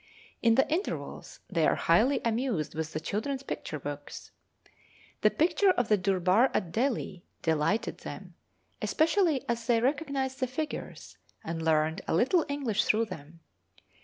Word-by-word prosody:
In 230 -1 +4
the 265 - +4
intervals 355 +7 -4
they 165 -5 +2
are - - +3
highly 225 +12 +3
amused 230 - -1
with 160 0 -4
the 155 - -3
children's 260 - -3
picture 155 - -5
books. 145 +1 -7 0.9
The - - +5
picture 365 +5 +2
of 245 -10 +1
the 210 - +5
durbar 190 +5 +3
at 170 - -1
Delhi 230 -5 -1 0.2
delighted 160 +7 0
them, - - -8 0.5
especially 325 -3 +2
as 235 +1 -2
they 235 -2 +4
recognised 270 0 -1
the 255 - 0
figures, 300 +5 -6 0.2
and 165 0 -4
learned 160 0 +1
a - - +1
little 305 - +3
English 255 -7 0
through 225 +2 +3
them. 165 -4 -10
230 Hz, 145 wpm, -29 LUFS, 165-270 Hz, 0.9 s, The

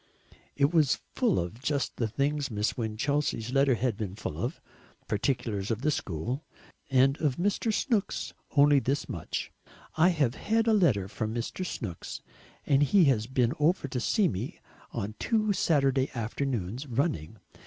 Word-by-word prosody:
It 140 +3 +2
was 155 -5 +3 0.2
full 235 -7 +2
of 90 +8 -3
just 140 0 -1
the 115 - 0
things 145 +5 -1
Miss 105 -1 -1
Winchelsea's 120 +1 -1
letter 135 -1 +4
had 120 -3 -1
been 100 -3 -4
full 110 - -5
of, - - -3 0.5
particulars 110 -3 -1
of 115 +2 -2
the 155 - +3
school. 120 - -3 0.5
And 135 +1 +4
of 145 -5 +2
Mr. 205 - 0
Snooks, 220 -2 -1 0.2
only 145 0 +7
this 135 +2 -1
much: - - -4 0.5
"I 165 +3 +6
have 145 -9 +1
had 225 +8 +1
a 225 - +4
letter 130 - +3
from 110 +2 -3
Mr. 120 +10 -3
Snooks, 105 - -5 0.4
and 140 0 +3
he 180 +6 +5
has 110 -2 -3
been 125 -2 +1
over 155 0 +2
to 125 - -2
see 200 - +2
me 95 - -4 0.3
on 100 +2 -4
two 215 -2 +1
Saturday 135 -7 +2
afternoons 120 0 -3
running. 115 - -1
135 Hz, 155 wpm, -29 LUFS, 110-150 Hz, 0.5 s, only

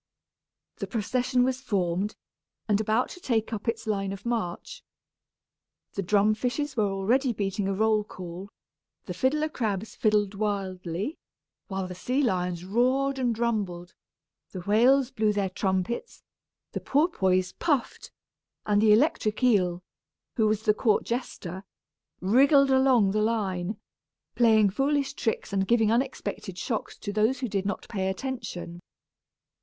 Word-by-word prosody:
The - - -4
procession 250 +2 0
was 260 +1 0
formed, 195 -3 -1 0.5
and 210 -1 +2
about 220 +3 +1
to - - -10
take 230 -8 -1
up 215 +2 -5
its 230 0 -1
line 195 -3 -1
of 195 +2 -8
march. 225 -8 -3 1.1
The 200 - -2
drum 205 +3 +3
fishes 260 +5 -2
were 210 -4 +2
already 235 +8 +1
beating 200 -1 -2
a 195 - 0
roll 215 +1 +2
call; 185 -1 -8 0.6
the - - -5
fiddler 300 +4 +1
crabs 220 -7 -3
fiddled 210 -2 +2
wildly; 195 - -3 0.5
while 190 -1 -3
the 180 - -6
sea 255 +10 -1
lions 180 -6 -1
roared 260 +6 +1
and 240 -3 0
rumbled, 200 -7 -2 0.6
the 185 - -7
whales 245 +7 +4
blew 215 -4 +1
their 200 -2 -1
trumpets, 190 - -2 0.5
the - - -4
porpoise 190 - +1
puffed, 290 -6 -1 0.5
and 205 -1 +3
the 215 -1 +6
electric 220 -3 +1
eel, 180 -7 +2 0.5
who 220 -2 +3
was 215 0 0
the 210 - +4
court 215 -1 +2
jester, 190 -6 -4 0.6
wriggled 275 +8 +5
along 260 -6 +4
the 215 +1 +1
line, 205 -3 -1 0.6
playing 220 -4 +4
foolish 280 +4 0
tricks 225 -3 -2
and 195 -1 +1
giving 225 -1 +3
unexpected 235 -6 -2
shocks 220 +3 -3
to 205 - -5
those 220 +5 +1
who 250 - -1
did 195 -2 -2
not 205 - -4
pay 190 -4 -2
attention. 190 -6 -5
215 Hz, 140 wpm, -27 LUFS, 195-250 Hz, 1.1 s, the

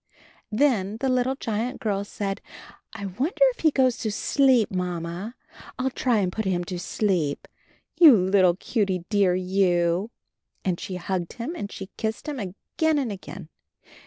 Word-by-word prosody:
Then 215 -5 +1
the 265 +1 0
little 255 +1 +1
giant 235 0 -3
girl 200 -2 -1
said, 200 -1 -4 0.6
'T 200 - -5
wonder 250 - -2 0.2
if - - -28
he 320 - +4
goes 260 -4 +2
to 220 -4 -2
sleep. 255 +1 +3
Mamma; 180 +4 -4 0.4
I'll 260 +1 -1
try 250 -2 +1
and 190 -3 +1
put 220 - -3
him 180 -2 0
to 175 0 -5
sleep. 175 -5 -1 0.5
You 305 -9 +9
little 185 -1 +4
cutie 190 -4 -1
dear, 200 -4 +3
you!" 180 0 +1 0.6
and 180 -3 0
she 185 - -5
hugged 180 -1 -3
him 240 +7 -5
and 205 -11 -5
she 190 -1 -8
kissed 220 +6 -3
him 290 -3 -3
again 265 - -1
and 260 -6 -1
again. 190 -3 -9
200 Hz, 160 wpm, -25 LUFS, 185-250 Hz, 0.6 s, You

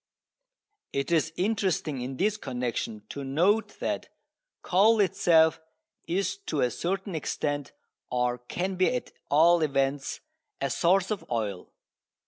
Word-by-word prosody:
It 140 +3 -1
is 165 -1 +2
interesting 185 - 0
in 130 +1 -5
this 205 +3 +2
connection 125 - -3
to 140 - -5
note 180 +11 +1
that - - -2 0.5
coal 215 +5 +4
itself 165 -5 +4 0.5
is 195 - 0
to - - 0
a 125 - +2
certain 190 +2 -3
extent, 145 -2 -2 0.4
or 125 0 0
can 180 +10 -3
be 185 +7 +3
at 250 - -4 0.2
all 165 +3 +5
events, 135 -2 0 0.4
a - - -1
source 190 +3 +2
of 210 - -2
oil. 105 -6 -3
160 Hz, 125 wpm, -28 LUFS, 135-190 Hz, 0.5 s, all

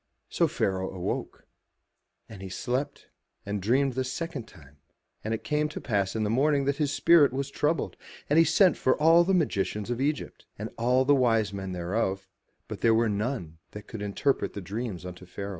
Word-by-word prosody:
So - - +2
Pharaoh 95 -1 -1
awoke. 90 -2 -5 0.8
And 100 -4 -11
he 95 - -7
slept 125 +8 -3 0.4
and 100 0 -3
dreamed 130 +6 +2
the 130 +1 -1
second 135 -1 -5
time 75 -4 -17 0.5
And 110 - -3
it 110 0 -2
came 150 +6 0
to - - -6
pass 100 -4 -1
in 110 - 0
the 105 - 0
morning 140 +3 +2
that 140 0 0
his 150 -3 0
spirit 145 -2 +5
was 135 +1 -3
troubled; 150 +4 -1 0.3
and 150 +3 +4
he - - +8
sent 170 +2 +4
for 130 - +2
all 165 +3 +6
the 190 +2 +2
magicians 105 - -1
of 120 +1 -2
Egypt, 150 +2 -3
and - - -6
all 125 +3 +2
the 145 - +5
wise 115 -6 +2
men 95 -1 -5
thereof, 95 +2 -2 0.4
but - - -7
there 115 -1 +4
was 115 -1 +2
none 100 - -3
that 105 0 -8
could 110 - -8
interpret 105 +7 0
the - - -5
dreams 100 -1 -5
unto 90 0 -9
Pharaoh. 100 +2 -6
115 Hz, 190 wpm, -27 LUFS, 100-140 Hz, 0.8 s, he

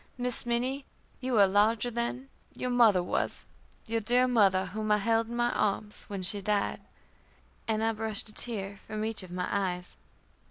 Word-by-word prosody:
Miss 245 -1 +1
Minnie, 255 +4 0 0.4
you 255 -2 -1
are 200 - +8
larger 215 +4 +2
than 240 +3 -3 0.3
your 250 - -2
mother 225 -7 +5
was - - -2 0.4
your 225 0 -1
dear 245 +4 +3
mother 195 -6 +3
whom 215 +3 -3
I 210 - +5
held 225 +2 +1
in 235 - -6
my 240 0 +1
arms 210 +1 -1
when 195 -2 -5
she 200 +2 +1
died;" 205 +1 0 0.9
and 220 -1 0
I 225 0 +2
brushed 220 -1 0
a 215 - -13
tear 200 -5 -2
from 215 +1 -5
each 220 -1 -3
of 185 - -11
my 180 0 -3
eyes. 180 -3 -2
220 Hz, 175 wpm, -29 LUFS, 200-235 Hz, 0.9 s, are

